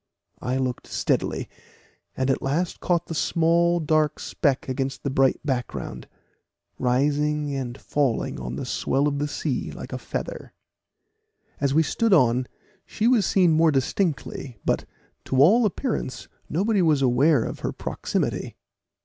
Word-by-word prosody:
I 125 +2 -1
looked 130 -2 -2
steadily, - - -1 0.7
and 130 +1 +1
at - - -1
last 165 +6 -1
caught 175 -1 0
the - - -6
small 170 +2 +2
dark 155 -1 +1
speck 140 -3 0
against 135 +1 -3
the 140 - -1
bright 135 -1 +3
background, 125 - -3 0.7
rising 145 +3 +1
and 130 -2 -4
falling 135 - -1
on 60 0 -5
the 70 - -4
swell 140 +2 0
of 145 -1 -1
the 145 - 0
sea 130 - -2
like - - -8
a - - -3
feather. - - -6 1.1
As 140 0 +1
we 160 - +5
stood 225 +7 +1
on, 125 -3 +3 0.4
she 220 - -1
was 235 -7 +4
seen 180 -4 +4
more 160 +1 +4
distinctly, 140 - -1
but, - - +1 0.4
to 130 - -1
all 215 - +6
appearance, 210 - -3 0.2
nobody 200 +5 +1
was 155 -5 +3
aware 130 +1 +4
of - - -5
her - - -2
proximity. - - -3
145 Hz, 145 wpm, -24 LUFS, 130-165 Hz, 1.1 s, all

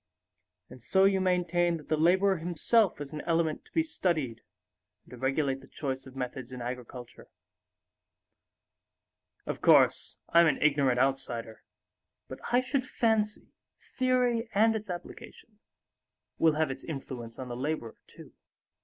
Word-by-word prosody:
And 125 0 -13
so 190 +11 +2
you 195 -1 +3
maintain 175 -2 +1
that 150 - -14
the 155 - +1
laborer 190 +5 +3
himself 175 +5 +1
is 145 0 -7
an 150 - -4
element 165 -2 0
to - - -23
be 325 - +2
studied 160 - -2 0.6
and - - -21
to 125 - -9
regulate 135 +1 0
the - - -15
choice 135 -2 -5
of 130 - -13
methods 130 -1 -5
in 125 - -7
agriculture. 125 0 -8 2.2
Of - - -5
course, - - +4
I'm 170 0 +6
an 150 - +1
ignorant 140 -4 +3
outsider; 120 -4 -1 0.7
but - - -9
I 245 +1 +4
should 260 0 -2
fancy 220 -4 0 0.3
theory 250 -3 0
and 225 +2 +4
its 215 -2 -5
application 205 +4 -9 0.8
will 160 -1 +4
have 155 -2 +1
its 135 - -8
influence 130 -6 -7
on 130 - -6
the 120 - -5
laborer 130 -3 -3
too." - - -15
155 Hz, 145 wpm, -29 LUFS, 130-195 Hz, 2.2 s, I'm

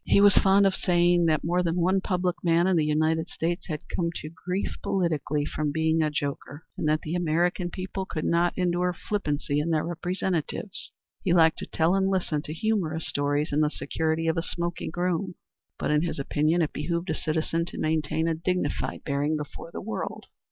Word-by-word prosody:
He - - +4
was 200 -1 +7
fond 195 +1 +5
of 195 - +3
saying 175 -1 +3
that 155 -2 +2
more 175 +2 +1
than 170 -1 0
one 185 +2 +2
public 180 -2 0
man 170 0 +4
in 190 -1 +3
the 160 - +3
United 155 +2 +1
States 170 +3 -2
had 155 -4 -3
come 170 -2 0
to 155 - -5
grief 180 +4 -3
politically 155 -5 0
from 150 0 -2
being 160 +1 +2
a 155 - +2
joker, 145 +1 -4
and - - -2
that 155 +1 +2
the 155 - -4
American 175 +1 +1
people 190 +1 -5
could 155 - -3
not 170 +1 +2
endure 180 0 +1
flippancy 150 -7 -1
in 155 +3 -1
their 155 -2 +1
representatives. 175 +2 -2 0.3
He 175 - +2
liked 160 -2 +5
to - - -6
tell 165 +2 +2
and 195 0 +2
listen 175 -6 0
to - - -5
humorous 165 -3 -1
stories 145 +1 0
in 150 - +3
the 150 - +3
security 160 +1 -1
of 160 +1 +1
a - - +2
smoking 170 0 -3
room, 180 +1 -1 0.4
but - - -1
in 150 0 +3
his 170 - -2
opinion 155 +4 +1
it 155 - -2
behooved 170 +4 -2
a - - +1
citizen 165 +1 -1
to - - -9
maintain 155 +1 0
a 165 - +2
dignified 180 +3 -2
bearing 145 +1 0
before 150 +2 -7
the - - -6
world. 220 +4 -5
165 Hz, 200 wpm, -27 LUFS, 155-180 Hz, 0.4 s, was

